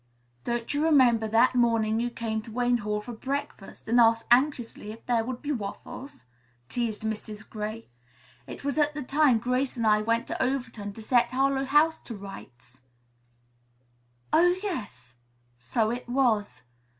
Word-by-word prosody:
"Don't 235 +1 -2
you 290 +1 0
remember 250 -8 +4
that 230 +4 +4
morning 230 -3 +2
you 240 +1 0
came 225 -2 -3
to 225 +1 -12
Wayne 245 +1 +1
Hall 210 0 -2
for 240 +3 -8
breakfast 275 -3 -5
and 235 +2 +3
asked 225 -1 +4
anxiously 245 -4 +1
if 225 +1 -12
there 235 -2 +1
would 245 +1 -6
be 295 - -2
waffles?" 235 - -7 0.4
teased 230 -3 -2
Mrs. 215 -1 -5
Gray. 215 +1 -6 0.6
"It - - -8
was 285 +2 0
at 295 0 +2
the 295 - -4
time 275 -2 +3
Grace 250 +3 -1
and 230 - -1
I 210 -1 +4
went 230 +2 0
to - - -4
Overton 235 -6 -3
to 220 - -10
set 240 +1 +3
Harlowe 270 +1 +1
House 300 +4 +3
to 230 - -8
rights." 130 - -12 1.5
"Oh, 355 +2 +5
yes! 210 - -5 0.4
So 125 - -1
it 245 0 -5
was." 240 -5 +1
235 Hz, 160 wpm, -27 LUFS, 215-265 Hz, 1.5 s, Oh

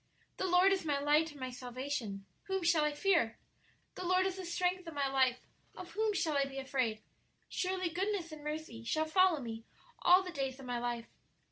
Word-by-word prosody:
'The 375 - 0
Lord 365 +2 +5
is 380 - -1
my 295 -3 +1
light 295 +3 +3
and 295 -2 -12
my 255 -1 -4
salvation; 245 -5 -4 0.2
whom 385 -2 -1
shall 335 -2 +4
I 300 - +2
fear? 295 - +2 0.6
the - - -6
Lord 370 +1 +3
is 380 0 -1
the 375 - -5
strength 360 +1 -1
of 325 - -7
my 280 -1 +1
life; 260 -2 +2 0.3
of 360 -1 -9
whom 435 +2 +1
shall 320 -6 0
I 280 -1 +3
be 275 0 -8
afraid?' 255 -5 -1 0.4
'Surely, 370 -1 -1
goodness 370 0 -2
and 305 -1 -9
mercy 300 -6 -5
shall 310 +7 0
follow 365 0 +4
me 225 -3 -6 0.4
all 365 +2 +6
the 365 - -6
days 270 -4 -3
of 270 - -9
my 245 -1 -2
life.' 240 -1 -3
305 Hz, 205 wpm, -34 LUFS, 260-365 Hz, 0.6 s, all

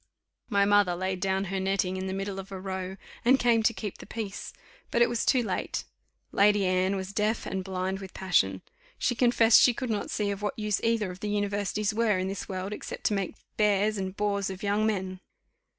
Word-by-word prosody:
My 200 -3 +3
mother 205 -3 +4
laid 185 +1 -2
down 190 +1 0
her 190 - 0
netting 190 -1 0
in 190 0 -3
the 190 - -3
middle 195 0 -3
of 195 +1 -9
a 190 - -5
row, 190 0 -4 0.3
and 260 +3 +5
came 235 -2 +4
to 220 - +3
keep 210 -3 -6
the - - -11
peace. 215 -3 -5 0.4
But 235 - +4
it - - +2
was 235 -1 -1
too 255 -2 +3
late; - - -2 0.5
Lady 205 0 +4
Anne 185 +1 +2
was 190 0 -5
deaf 215 +1 0
and 190 -1 -3
blind 190 0 -2
with 190 -2 -10
passion. 95 - +1 0.3
She 245 - +1
confessed 235 -2 +5
she 245 - +5
could 255 -3 -3
not 210 - -2
see 205 -1 -1
of 200 0 -5
what 205 - -2
use 210 -3 0
either 225 -4 +1
of 180 - -10
the 210 - -3
universities 205 0 -1
were 215 -3 +2
in 185 +1 -1
this 195 +1 -5
world, 190 +1 -3
except - - -7
to - - +2
make 195 0 -2 0.2
bears 210 0 +2
and 190 0 -4
bores 200 -1 0
of 190 +2 -7
young 205 +2 +2
men. 190 -3 -2
200 Hz, 215 wpm, -28 LUFS, 190-215 Hz, 0.5 s, and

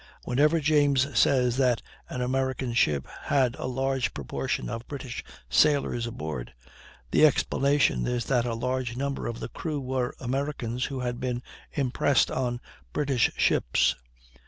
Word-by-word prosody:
Whenever 150 +6 +3
James 145 -2 +3
says 125 -3 +3
that 125 -3 +3 0.3
an 125 - -4
American 130 -1 -1
ship 75 - +2 0.2
had 130 -4 +2
a - - -3
large 135 0 -1
proportion 60 -2 -3
of 115 - -5
British 130 -4 -6 0.2
sailors 120 - +3
aboard, 75 - -5 0.6
the - - +4
explanation 140 - +3
is 120 -1 -1
that 125 -3 +1
a 115 - -1
large 125 0 -2
number 140 +1 -2
of 115 0 -4
the - - -5
crew 155 -3 -3
were 130 -2 -2
Americans 130 -2 -2
who 135 -3 -4
had 120 -1 -2
been 125 -1 -2 0.3
impressed 135 0 +2
on 120 -2 -1 0.3
British 135 -4 +2
ships. - - +3
130 Hz, 140 wpm, -27 LUFS, 120-140 Hz, 0.6 s, the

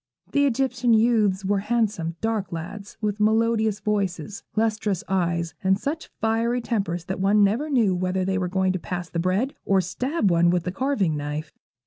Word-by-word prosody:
The 285 0 +3
Egyptian 250 -2 +2
youths 215 -4 +2
were 200 +1 +2
handsome, 210 -6 -1
dark 220 -4 -1
lads, 175 +5 -7
with 210 -1 -1
melodious 220 0 +2
voices, 200 -1 -2
lustrous 215 -4 0
eyes, 170 -3 0
and 190 0 +3
such 305 +9 -4
fiery 225 +2 +1
tempers 195 -8 -2
that 190 - -4
one 200 +2 +4
never 230 +10 +1
knew 230 -9 +3
whether 185 +1 -1
they 190 0 0
were 180 - -1
going 190 0 +1
to 185 - -2
pass 180 0 -5
the 170 - -2
bread 190 +10 0
or 195 -1 +3
stab 200 - 0
one 170 0 +4
with 175 -1 +1
the 180 - -3
carving 200 - 0
knife. 150 +1 -4
200 Hz, 175 wpm, -24 LUFS, 180-225 Hz, -, one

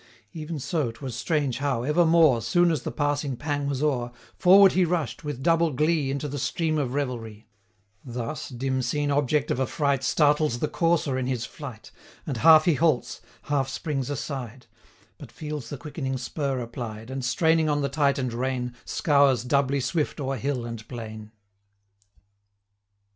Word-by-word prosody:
Even 160 0 -5
so 145 -1 -1
'twas 120 +1 -7
strange 140 -1 -1
how, 135 -4 -1
evermore, 160 -2 +4
250 115 - -5
Soon 175 -1 +4
as 155 -5 -1
the - - -4
passing 145 -3 -1
pang 145 0 -2
was 140 0 -2
o'er, 125 -5 0 0.2
Forward 195 +1 +7
he 185 - +3
rush'd, 170 -5 -1
with 145 -4 -5
double 165 +1 +3
glee, 150 +1 +1
Into 140 +2 -2
the 145 0 -4
stream 155 +3 0
of 135 -2 -2
revelry: 115 -6 -4 0.6
Thus, 120 +2 -5
dim 130 +1 -2
seen 145 +3 -1
object 145 +1 +1
of - - -1
affright 140 0 0
Startles 150 -2 +2
the 150 - -1
courser 165 -6 +1
in 125 - -2
his 125 -3 -2
flight, 130 -7 -10 0.3
255 - - -30
And 135 - -2
half 155 +4 +7
he 175 - +4
halts, 150 -6 0 0.2
half 140 -2 0
springs 135 -1 -3
aside; 130 -3 -5 0.5
But - - -11
feels 150 -6 -6
the 145 - -5
quickening 135 -2 -4
spur 135 +2 -3
applied, 115 -1 -7
And, 135 0 -4
straining 160 +4 +2
on 145 0 +1
the - - +1
tighten'd 140 -3 0
rein, 125 0 -2
Scours 140 -5 +3
doubly 140 +1 +1
swift 145 +5 -1
o'er 135 -1 -2
hill 125 0 -2
and 115 -2 -7
plain. 110 -3 -8
140 Hz, 165 wpm, -26 LUFS, 125-150 Hz, 0.6 s, Forward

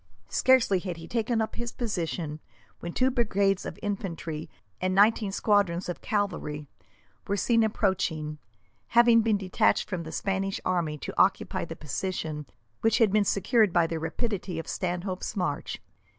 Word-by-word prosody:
Scarcely 255 -7 +4
had 180 -2 -5
he 165 0 -9
taken 230 +1 0
up 220 - -6
his 240 0 -3
position 170 -8 -3 0.4
when 170 - -5
two 260 +7 +2
brigades 200 -5 +1
of - - -7
infantry 170 -6 -4 0.3
and 185 0 0
nineteen 210 0 +4
squadrons 195 -4 +2
of 175 -5 -5
cavalry 175 -8 -2 0.6
were 200 - 0
seen 230 +3 +3
approaching, 165 -8 0 0.6
having 235 -1 +7
been 220 -2 +2
detached 195 +3 +1
from 185 -4 -3
the 160 -1 -7
Spanish 195 +1 -1
army 170 -5 0
to - - -6
occupy - - +1
the - - -7
position 155 -1 -4 0.3
which 225 - +3
had 220 -4 +4
been 215 -1 +4
secured 210 +1 +3
by 170 -1 +4
the 165 0 -3
rapidity 185 +2 -3
of 165 - -5
Stanhope's 185 +1 -3
march. 150 -6 -2
190 Hz, 150 wpm, -28 LUFS, 170-215 Hz, 0.6 s, having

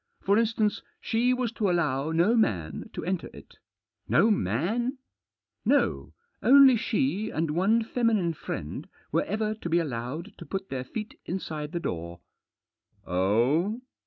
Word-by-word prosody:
For 200 +3 +4
instance, 220 -2 +1 0.2
she 240 +2 +1
was 250 -3 0
to 215 -4 0
allow 150 -4 0
no 175 +8 +3
man 90 - 0
to - - -5
enter 185 0 -2
it." - - -15 0.2
" 105 0 -54
No 220 - +5
man? 210 - 0 0.2
" - - -64
" - - -59
No; - - -2 0.3
only 270 0 +8
she 210 - 0
and 160 -1 -1
one 200 +8 +2
feminine 220 -7 +1
friend 75 - -6 0.2
were - - +1
ever 215 +1 -1
to 215 -6 -6
be 170 - +3
allowed 150 - -3
to - - -8
put 195 0 -4
their 130 -2 -3
feet 215 - -7
inside 155 -4 -4
the 170 - -2
door." 85 - -5 0.9
"Oh?" 120 - +1
180 Hz, 155 wpm, -27 LUFS, 135-220 Hz, 0.9 s, only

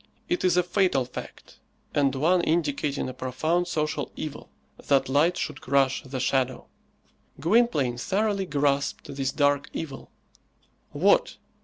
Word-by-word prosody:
It 350 - -1
is 180 -1 +3
a 180 - +4
fatal 175 -8 +1
fact, 125 - -10 0.3
and 140 -2 +2
one 170 +6 +3
indicating 150 -4 0
a 130 - -5
profound 155 +8 -1
social 155 -1 -2
evil, 150 -2 -7 0.4
that 135 -2 +3
light 160 +6 +3
should - - -4
crush 135 0 +2
the 130 0 -6
shadow! 130 0 0 0.7
Gwynplaine 155 - +2
thoroughly 200 - 0
grasped 140 -2 0
this 135 -1 -1
dark 145 -1 +1
evil. 140 -5 -6 0.8
What! - - +2
145 Hz, 130 wpm, -26 LUFS, 135-175 Hz, 0.8 s, a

